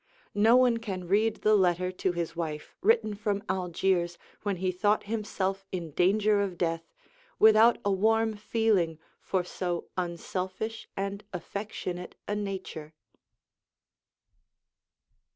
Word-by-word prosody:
No 220 Hz, +3 st, +5 dB
one 250 Hz, -2 st, +5 dB
can 190 Hz, -6 st, -5 dB
read 210 Hz, +4 st, +1 dB
the 215 Hz, -, +5 dB
letter 180 Hz, -2 st, +3 dB
to 185 Hz, 0 st, -1 dB
his 170 Hz, -1 st, -3 dB
wife, 155 Hz, -3 st, -4 dB
written 410 Hz, -, +3 dB
from 205 Hz, -1 st, -2 dB
Algiers 180 Hz, -1 st, 0 dB, 0.2 s
when 205 Hz, -2 st, -1 dB
he 185 Hz, +1 st, -1 dB
thought 205 Hz, +4 st, +1 dB
himself 200 Hz, -3 st, -2 dB
in 170 Hz, -4 st, -4 dB
danger 205 Hz, +5 st, +3 dB
of 190 Hz, -3 st, -2 dB
death, 165 Hz, -1 st, -1 dB, 0.5 s
without 220 Hz, +2 st, +7 dB
a 200 Hz, -, +3 dB
warm 220 Hz, +3 st, +2 dB
feeling 205 Hz, -6 st, +1 dB, 0.2 s
for 185 Hz, -2 st, 0 dB
so 175 Hz, -1 st, -3 dB
unselfish 185 Hz, +5 st, -4 dB
and 200 Hz, +1 st, -3 dB
affectionate 180 Hz, -1 st, -5 dB
a 205 Hz, -, -1 dB
nature. 190 Hz, -6 st, -5 dB
195 Hz, 120 wpm, -29 LUFS, 180-215 Hz, 0.5 s, without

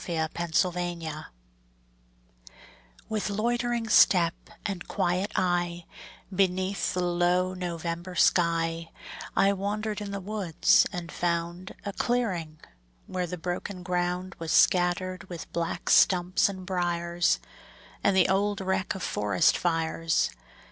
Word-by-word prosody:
IN 160 Hz, -2 st, 0 dB, 0.4 s
NOVEMBER 175 Hz, -4 st, -4 dB, 1.8 s
With 215 Hz, -1 st, -2 dB
loitering 235 Hz, +2 st, -1 dB
step 175 Hz, -5 st, +5 dB, 0.3 s
and 190 Hz, -4 st, -4 dB
quiet 180 Hz, +4 st, 0 dB
eye, 175 Hz, -2 st, 0 dB, 0.5 s
Beneath 190 Hz, 0 st, 0 dB
the 180 Hz, -, 0 dB
low 175 Hz, +1 st, +1 dB
November 175 Hz, 0 st, -4 dB
sky, 165 Hz, -1 st, +2 dB, 0.5 s
I 195 Hz, +1 st, +4 dB
wandered 210 Hz, +2 st, -3 dB
in 205 Hz, -, -5 dB
the 200 Hz, 0 st, -4 dB
woods, 195 Hz, -4 st, +2 dB
and 175 Hz, -1 st, -6 dB
found 170 Hz, +1 st, -2 dB
A 200 Hz, -, -3 dB
clearing, 185 Hz, -12 st, -1 dB, 0.5 s
where 180 Hz, -1 st, -3 dB
the 180 Hz, +1 st, -5 dB
broken 180 Hz, +2 st, -4 dB
ground 180 Hz, +1 st, -2 dB
Was 165 Hz, -1 st, -3 dB
scattered 185 Hz, +1 st, +2 dB
with 175 Hz, -2 st, -8 dB
black 170 Hz, -1 st, -3 dB
stumps 180 Hz, +1 st, +4 dB
and 190 Hz, -2 st, -7 dB
briers, 175 Hz, -1 st, 0 dB, 0.7 s
And 195 Hz, -1 st, +3 dB
the 185 Hz, -, +5 dB
old 200 Hz, +1 st, +1 dB
wreck 190 Hz, 0 st, -1 dB
of 190 Hz, -, -6 dB
forest 100 Hz, -3 st, +2 dB
fires. 165 Hz, -1 st, 0 dB
180 Hz, 115 wpm, -27 LUFS, 170-195 Hz, 1.8 s, step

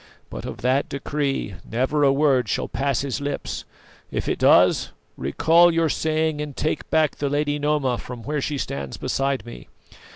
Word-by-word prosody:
But -, -, -6 dB
of -, -, -7 dB
that 130 Hz, +3 st, +2 dB
decree 140 Hz, -6 st, -2 dB
never 130 Hz, +6 st, 0 dB
a 140 Hz, -, +5 dB
word 135 Hz, -5 st, +2 dB
shall -, -, -1 dB
pass 135 Hz, -2 st, -1 dB
his 140 Hz, 0 st, -3 dB
lips; 145 Hz, 0 st, -4 dB, 0.4 s
if -, -, -3 dB
it -, -, -1 dB
does, -, -, +5 dB, 0.3 s
recall 165 Hz, -, +4 dB
your 165 Hz, -1 st, +2 dB
saying 155 Hz, 0 st, 0 dB
and 150 Hz, -2 st, -6 dB
take 155 Hz, -, -2 dB
back 155 Hz, -2 st, +2 dB
the 145 Hz, -, -1 dB
lady 145 Hz, +1 st, 0 dB
Noma 145 Hz, -4 st, +1 dB
from 125 Hz, -2 st, -8 dB
where 150 Hz, +2 st, -2 dB
she 145 Hz, +1 st, -2 dB
stands 70 Hz, -, -4 dB
beside 135 Hz, -1 st, -1 dB
me. 90 Hz, -, -10 dB
140 Hz, 170 wpm, -23 LUFS, 130-150 Hz, 0.4 s, a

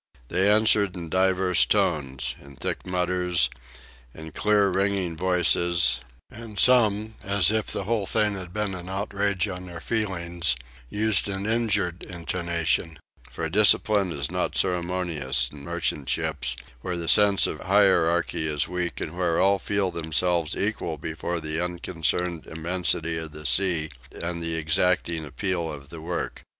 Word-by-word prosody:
They 95 Hz, +4 st, +3 dB
answered 105 Hz, -3 st, +3 dB
in 85 Hz, -2 st, -6 dB
divers 95 Hz, 0 st, +3 dB
tones: 75 Hz, -10 st, 0 dB
in 70 Hz, -1 st, -14 dB
thick -, -, -4 dB
mutters, 90 Hz, -1 st, 0 dB, 0.6 s
in 80 Hz, 0 st, -9 dB
clear, 105 Hz, +1 st, +2 dB
ringing 95 Hz, -2 st, 0 dB
voices; 85 Hz, -5 st, +2 dB, 0.3 s
and 110 Hz, -2 st, -10 dB
some, 110 Hz, -3 st, +4 dB
as 100 Hz, 0 st, +3 dB
if 110 Hz, -1 st, -1 dB
the -, -, -1 dB
whole 105 Hz, -1 st, -1 dB
thing 105 Hz, +1 st, +2 dB
had 90 Hz, -3 st, -7 dB
been 105 Hz, 0 st, -2 dB
an 90 Hz, 0 st, -7 dB
outrage 100 Hz, 0 st, -1 dB
on 90 Hz, -1 st, -7 dB
their 85 Hz, -1 st, -8 dB
feelings, 85 Hz, -, -1 dB, 0.3 s
used 105 Hz, -1 st, +2 dB
an 95 Hz, 0 st, -4 dB
injured 105 Hz, -6 st, 0 dB
intonation: 85 Hz, -2 st, -2 dB, 0.3 s
for 80 Hz, +6 st, -4 dB
discipline 100 Hz, +1 st, +3 dB
is 70 Hz, -4 st, -4 dB
not -, -, -2 dB
ceremonious 85 Hz, -8 st, 0 dB
in 70 Hz, -1 st, -12 dB
merchant 80 Hz, -4 st, -3 dB
ships, 60 Hz, -1 st, 0 dB, 0.2 s
where 90 Hz, +7 st, -4 dB
the 85 Hz, -1 st, -4 dB
sense 100 Hz, 0 st, +6 dB
of -, -, -3 dB
hierarchy 85 Hz, -4 st, +2 dB
is 75 Hz, -2 st, -1 dB
weak, 90 Hz, -1 st, -3 dB
and 80 Hz, -, -5 dB
where 90 Hz, -2 st, 0 dB
all 100 Hz, +1 st, +3 dB
feel 100 Hz, -1 st, -1 dB
themselves 85 Hz, 0 st, 0 dB
equal 100 Hz, -6 st, -2 dB
before 80 Hz, +3 st, -4 dB
the 80 Hz, +2 st, -3 dB
unconcerned 85 Hz, -1 st, -2 dB
immensity 85 Hz, 0 st, -1 dB
of 80 Hz, -2 st, -8 dB
the 75 Hz, 0 st, -10 dB
sea 85 Hz, -2 st, +2 dB, 0.3 s
and 85 Hz, 0 st, -4 dB
the 85 Hz, 0 st, -1 dB
exacting 80 Hz, +1 st, +1 dB
appeal 85 Hz, +3 st, -3 dB
of 70 Hz, -1 st, -10 dB
the 80 Hz, -1 st, -9 dB
work. 85 Hz, +2 st, -4 dB
90 Hz, 145 wpm, -25 LUFS, 80-100 Hz, 0.6 s, sense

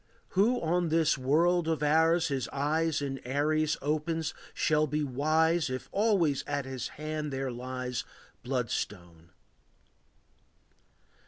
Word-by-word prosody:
Who 225 Hz, +6 st, +3 dB
on 170 Hz, +1 st, +1 dB
this 160 Hz, -1 st, +3 dB
world 160 Hz, +6 st, +2 dB
of 160 Hz, -2 st, 0 dB
ours 160 Hz, +2 st, +3 dB
his 135 Hz, -4 st, -1 dB
eyes 150 Hz, +2 st, 0 dB
In 135 Hz, -1 st, -3 dB
Aries 150 Hz, +4 st, +1 dB
opens 155 Hz, +2 st, -1 dB, 0.2 s
shall 155 Hz, 0 st, +2 dB
be 150 Hz, +1 st, -1 dB
wise 155 Hz, +3 st, +2 dB
If 130 Hz, 0 st, -5 dB
always 195 Hz, -9 st, +2 dB
on 145 Hz, -1 st, -1 dB
his 130 Hz, -2 st, -4 dB
hand 155 Hz, 0 st, -3 dB
there 135 Hz, -1 st, -2 dB
lies 125 Hz, 0 st, -4 dB
A -, -, -25 dB
bloodstone. 90 Hz, -9 st, -3 dB
150 Hz, 120 wpm, -30 LUFS, 135-160 Hz, 0.2 s, Who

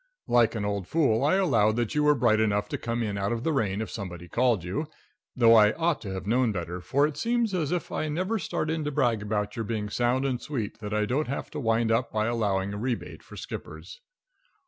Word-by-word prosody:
Like 120 Hz, -2 st, +3 dB
an 105 Hz, -2 st, -2 dB
old 100 Hz, -3 st, -2 dB
fool, 140 Hz, -8 st, +2 dB
I 150 Hz, +6 st, +3 dB
allowed 115 Hz, -, +3 dB
that 120 Hz, -2 st, -1 dB
you 150 Hz, -, +2 dB
were 150 Hz, 0 st, +5 dB
bright 120 Hz, -4 st, +3 dB
enough 105 Hz, -1 st, +1 dB
to -, -, -2 dB
come 115 Hz, 0 st, -2 dB
in 100 Hz, -2 st, -2 dB
out 100 Hz, +2 st, -1 dB
of 115 Hz, 0 st, -2 dB
the 160 Hz, -, +1 dB
rain 105 Hz, -6 st, 0 dB
if 110 Hz, -, -5 dB
somebody 90 Hz, -4 st, -7 dB
called 120 Hz, 0 st, +1 dB
you, 100 Hz, -, -3 dB, 0.5 s
though 115 Hz, -2 st, +6 dB
I 105 Hz, -2 st, +6 dB
ought 165 Hz, -6 st, 0 dB
to 100 Hz, -4 st, -6 dB
have 95 Hz, 0 st, -5 dB
known 120 Hz, +2 st, +2 dB
better, 90 Hz, -2 st, -4 dB
for 140 Hz, +10 st, +2 dB
it 150 Hz, -1 st, -3 dB
seems 235 Hz, -2 st, 0 dB
as 160 Hz, -6 st, -1 dB
if 180 Hz, -1 st, -2 dB
I 155 Hz, -, -2 dB
never 185 Hz, +8 st, -1 dB
start 155 Hz, -4 st, -2 dB
in 160 Hz, -1 st, -2 dB
to 150 Hz, -, -1 dB
brag 120 Hz, -7 st, +1 dB
about 105 Hz, +1 st, -2 dB
your 115 Hz, -, -2 dB
being 105 Hz, -2 st, -3 dB
sound 125 Hz, +4 st, +1 dB
and 130 Hz, -3 st, -1 dB
sweet 115 Hz, -7 st, -4 dB
that 105 Hz, -2 st, -6 dB
I 105 Hz, 0 st, +1 dB
don't 135 Hz, +7 st, -1 dB
have 135 Hz, -, -4 dB
to 150 Hz, -, -5 dB
wind 115 Hz, -2 st, +1 dB
up 115 Hz, +2 st, +1 dB
by 110 Hz, 0 st, 0 dB
allowing 100 Hz, -4 st, 0 dB
a 100 Hz, -, -5 dB
rebate 120 Hz, +1 st, -4 dB
for -, -, -13 dB
skippers. -, -, -8 dB
115 Hz, 240 wpm, -27 LUFS, 105-145 Hz, 0.5 s, though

